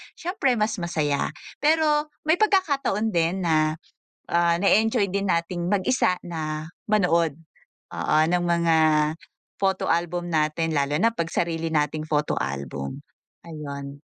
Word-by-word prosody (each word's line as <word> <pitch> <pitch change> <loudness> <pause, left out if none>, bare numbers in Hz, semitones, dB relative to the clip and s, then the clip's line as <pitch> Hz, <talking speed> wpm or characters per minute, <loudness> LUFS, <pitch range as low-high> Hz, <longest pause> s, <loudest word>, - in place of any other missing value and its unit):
siyempre, 330 -7 0
mas 215 -1 -1
masaya. 155 -5 -1 0.3
Pero 300 0 +2 0.2
may 315 - +5
pagkakataon 280 - +1
din 170 +2 0
na, 155 -1 +2 0.5
ah, 170 0 +3
nae-enjoy 215 0 +3
din 200 +1 -1
nating 170 0 -1
mag-isa 205 +2 +2
na 155 -2 -4 0.2
manood. 170 -7 +2 0.6
Oo, - - -1
ng 175 0 +1
mga 170 -1 +2 0.8
photo 190 -1 0
album 175 +1 -1
natin, 160 0 0
lalo 140 +1 +1
na 230 - +5
'pag 170 -7 -3
sarili 165 -1 -1
nating 155 +1 0
photo 150 -1 0
album. 70 +1 -4 0.4
Ayun. 140 -3 -7
170 Hz, 125 wpm, -24 LUFS, 155-210 Hz, 0.8 s, may